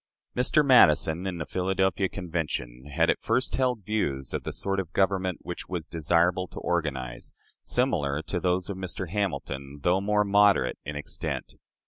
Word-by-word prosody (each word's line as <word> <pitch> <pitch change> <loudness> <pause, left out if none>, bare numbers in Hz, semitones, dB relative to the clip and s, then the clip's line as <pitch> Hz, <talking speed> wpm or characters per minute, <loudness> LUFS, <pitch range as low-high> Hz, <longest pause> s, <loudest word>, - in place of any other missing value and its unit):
Mr. 135 +4 +3
Madison, 85 - +5
in 90 -2 -3
the 85 - -4
Philadelphia 95 +2 0
Convention, 80 -9 -4
had - - +3
at - - -4
first 130 - +1
held 125 -6 0
views 70 - -1
of - - -1
the - - -5
sort 95 0 -1
of 90 -4 -4
government 95 -2 +1
which - - -6
it - - -32
was 85 -3 -4
desirable 85 +3 +1
to - - -14
organize, 65 -8 -3 0.3
similar 70 +1 0
to 90 - -3
those 90 0 0
of 100 -2 -5
Mr. 95 -1 -4
Hamilton, 75 -9 -3
though 90 +2 +3
more 105 +1 +2
moderate 100 0 +3
in 75 - -5
extent. 75 +1 -4
90 Hz, 165 wpm, -27 LUFS, 75-100 Hz, 0.3 s, Madison